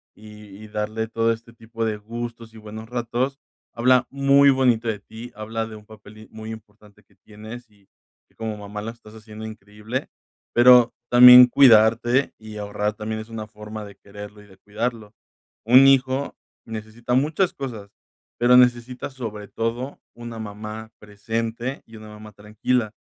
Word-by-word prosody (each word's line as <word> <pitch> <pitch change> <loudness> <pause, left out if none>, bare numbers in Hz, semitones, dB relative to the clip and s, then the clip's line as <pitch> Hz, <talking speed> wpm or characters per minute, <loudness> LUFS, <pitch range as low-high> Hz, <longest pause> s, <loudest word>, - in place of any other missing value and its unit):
y 105 0 -14 0.2
y 110 - -10
darle 110 +1 -3
todo 115 0 0
este 115 +1 -7
tipo 115 0 -6
de 110 - -1
gustos 115 +1 -8
y - - -14
buenos 110 +1 -10
ratos. 125 +3 -2 0.3
Habla 125 +1 +3
muy 140 0 +4
bonito 125 -4 +2
de 105 -2 -3
ti, 110 +4 -11
habla 110 +1 -4
de 110 -1 -10
un 105 - -16
papel 110 0 -15
y 110 - -14
muy 110 0 -9
importante 105 -1 -14
que 100 - -31
tienes 110 +4 -12
y 100 -2 -28 0.4
que - - -35
como 110 -1 -5
mamá 105 0 -7
la 110 +2 -5
estás 110 -2 -17
haciendo 110 0 -10
increíble. 110 +3 -7 0.4
Pero 120 0 +7 0.2
también 125 0 +10
cuidarte 120 0 +4
y 110 -1 -10
ahorrar 105 0 -3
también 110 +1 -5
es 110 - -12
una 110 -1 -6
forma 105 0 -9
de 100 - -13
quererlo 105 +1 -12
y 105 - -18
de 95 -1 -19
cuidarlo. 110 +1 -5 0.5
Un 130 +4 +7
hijo 135 +1 +2 0.3
necesita 110 +2 -6
muchas 155 +8 +1
cosas, 115 -7 -7 0.5
pero 125 +1 +5
necesita 125 +2 +1
sobre 110 -6 -7
todo 120 +4 -4
una 120 -1 -8
mamá 110 +1 -8
presente 115 +4 -5
y 115 - -15
una 110 0 -12
mamá 105 0 -12
tranquila, 105 +2 -2
110 Hz, 165 wpm, -22 LUFS, 105-120 Hz, 0.5 s, también